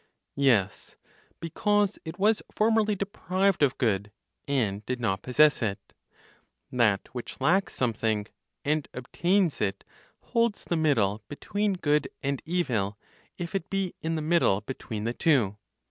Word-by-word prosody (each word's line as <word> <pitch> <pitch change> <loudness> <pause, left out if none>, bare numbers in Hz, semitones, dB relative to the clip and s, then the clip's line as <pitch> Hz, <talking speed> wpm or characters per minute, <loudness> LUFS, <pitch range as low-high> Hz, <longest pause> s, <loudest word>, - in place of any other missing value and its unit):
Yes, 115 -9 +2 0.4
because 205 +4 +1
it 160 +1 -6
was 210 +2 +3
formerly 215 -1 +2
deprived 195 -1 0
of 140 -3 +3
good, 105 -4 0 0.4
and 110 -8 0
did 130 -1 -2
not 95 -5 0
possess 150 +4 +4
it. 100 -4 -3 0.8
That 110 -6 +2
which 125 -2 -7
lacks 180 +9 +2
something, 110 -3 0 0.4
and 150 0 0
obtains 175 +7 +1
it, 100 -1 -1 0.4
holds 230 -3 0
the 170 - -1
middle 115 -10 +2
between 205 +7 -1
good 150 -4 +1 0.2
and 140 -1 -1
evil, 115 - 0 0.4
if 175 +1 -5
it 195 -2 -2
be 195 -2 -1
in 165 +1 -1
the 155 - -2
middle 155 - +3
between 110 -2 -6
the 115 +2 -1
two. 120 -10 +2
145 Hz, 135 wpm, -27 LUFS, 110-185 Hz, 0.8 s, possess